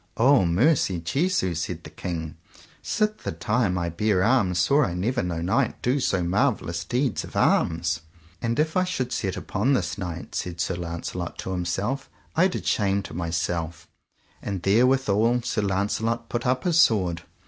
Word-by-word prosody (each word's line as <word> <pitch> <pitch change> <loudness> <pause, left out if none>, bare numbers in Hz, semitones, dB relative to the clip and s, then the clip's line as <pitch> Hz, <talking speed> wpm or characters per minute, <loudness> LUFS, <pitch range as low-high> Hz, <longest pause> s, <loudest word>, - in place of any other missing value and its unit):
O 130 -3 +5
mercy 95 - +2
Jesu! 135 - 0
said 80 0 -4
the - - -10
king, 80 -3 -5 0.5
sith 215 0 0
the - - -4
times 95 +3 0
I 85 -1 -1
bare 95 +2 +1
arms 105 -6 +3
saw 140 +12 +4
I 90 -7 -2
never 120 +8 0
no 85 -2 -3
knight 115 +8 +1
do 130 +4 +2
so 95 -8 +1
marvellous 90 -3 0
deeds 125 +4 -1
of - - -11
arms. 80 0 +2 0.4
And 115 -1 -1
if 155 +1 +1
I 185 - +4
should 130 -9 -2
set 95 -7 -2
upon 115 +7 0
this 105 -6 -1
knight, 85 -3 -6
said 85 -2 -4
Sir 95 - 0
Launcelot 85 0 -5
to - - -5
himself, 95 +10 -2 0.3
I 175 +4 +5
did 185 - -5
shame 100 -3 +1
to - - -9
myself, 85 0 -3 0.5
and 95 -4 -4
therewithal 120 +1 +3
Sir 115 -2 -1
Launcelot 105 +4 -1
put 120 +1 -2
up 125 0 +1
his 170 -2 +2
sword. 90 - +3
100 Hz, 170 wpm, -25 LUFS, 85-125 Hz, 0.5 s, O